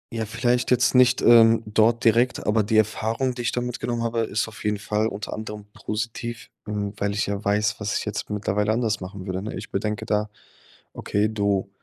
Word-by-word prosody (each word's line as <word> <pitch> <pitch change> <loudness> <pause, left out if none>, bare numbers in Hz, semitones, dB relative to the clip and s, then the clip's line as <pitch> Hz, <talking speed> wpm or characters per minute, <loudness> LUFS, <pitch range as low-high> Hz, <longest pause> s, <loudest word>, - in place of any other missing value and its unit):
Ja, 110 -1 -1
vielleicht 120 +3 0
jetzt 125 0 +3
nicht, 125 -1 +4
ähm, 115 -1 +6
dort 110 +2 +2
direkt. 120 +3 +2
Aber 105 +1 +3
die 110 +2 +1
Erfahrung, 110 +4 +1
die 120 - -6
ich 120 - 0
da 125 - -1
mitgenommen 120 -1 -3
habe, 115 0 -1
ist 110 0 -1
auf 110 - -11
jeden 105 0 0
Fall 105 +2 -1
unter 105 -1 -5
anderem 105 -1 -7
positiv, 115 +2 -5
hm, 105 -1 -3
weil 100 0 -1
ich 100 - 0
ja 100 0 -3
weiß, 105 +1 +1
was 105 -1 -1
ich - - -4
jetzt 105 -1 -4
mittlerweile 105 0 0
anders 110 -3 0
machen 95 0 -7
würde, 95 -1 -3
ne? 110 - -5
Ich - - -8
bedenke 105 +1 -2
da: 105 0 0 0.6
„Okay, 105 +1 0
du 100 -2 0
110 Hz, 205 wpm, -24 LUFS, 105-115 Hz, 0.6 s, ähm